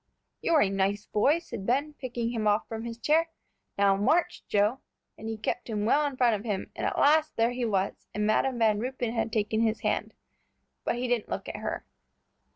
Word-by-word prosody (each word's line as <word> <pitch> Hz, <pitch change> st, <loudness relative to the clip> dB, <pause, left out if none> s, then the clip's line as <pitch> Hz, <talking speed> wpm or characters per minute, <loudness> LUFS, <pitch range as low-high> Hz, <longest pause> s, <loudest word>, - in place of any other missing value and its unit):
"You're 320 Hz, -3 st, +3 dB
a 195 Hz, -, +1 dB
nice 195 Hz, +1 st, 0 dB
boy," 275 Hz, +9 st, +3 dB
said 230 Hz, -, -7 dB
Ben, 280 Hz, +5 st, +1 dB
picking 240 Hz, -4 st, -3 dB
him 220 Hz, -3 st, -1 dB
off 205 Hz, 0 st, +2 dB
from 225 Hz, 0 st, -5 dB
his 230 Hz, -1 st, -5 dB
chair. 320 Hz, +6 st, +2 dB, 0.5 s
"Now 200 Hz, -1 st, +4 dB
march, 260 Hz, -, +1 dB
Joe," 210 Hz, +5 st, +2 dB, 0.4 s
and 220 Hz, -, -7 dB
he 225 Hz, -, -3 dB
kept 230 Hz, +3 st, -3 dB
him 210 Hz, -2 st, -1 dB
well 290 Hz, +6 st, +4 dB
in 275 Hz, -2 st, -6 dB
front 245 Hz, -3 st, +4 dB
of 205 Hz, -1 st, -2 dB
him; 205 Hz, -5 st, -3 dB
and -, -, -1 dB
at -, -, -2 dB
last, 310 Hz, +1 st, +4 dB
there 230 Hz, +1 st, +2 dB
he 245 Hz, 0 st, -2 dB
was, 195 Hz, -3 st, -1 dB
and 210 Hz, 0 st, -1 dB
Madam 245 Hz, +4 st, +2 dB
Van 220 Hz, -3 st, +3 dB
Ruypen 245 Hz, -1 st, -2 dB
had 225 Hz, -1 st, -1 dB
taken 220 Hz, +1 st, 0 dB
his 225 Hz, -1 st, +1 dB
hand. -, -, -1 dB, 0.7 s
But -, -, +1 dB
he 250 Hz, +1 st, -2 dB
didn't 240 Hz, -3 st, 0 dB
look -, -, -4 dB
at -, -, -5 dB
her. -, -, -4 dB
230 Hz, 210 wpm, -28 LUFS, 210-255 Hz, 0.7 s, Now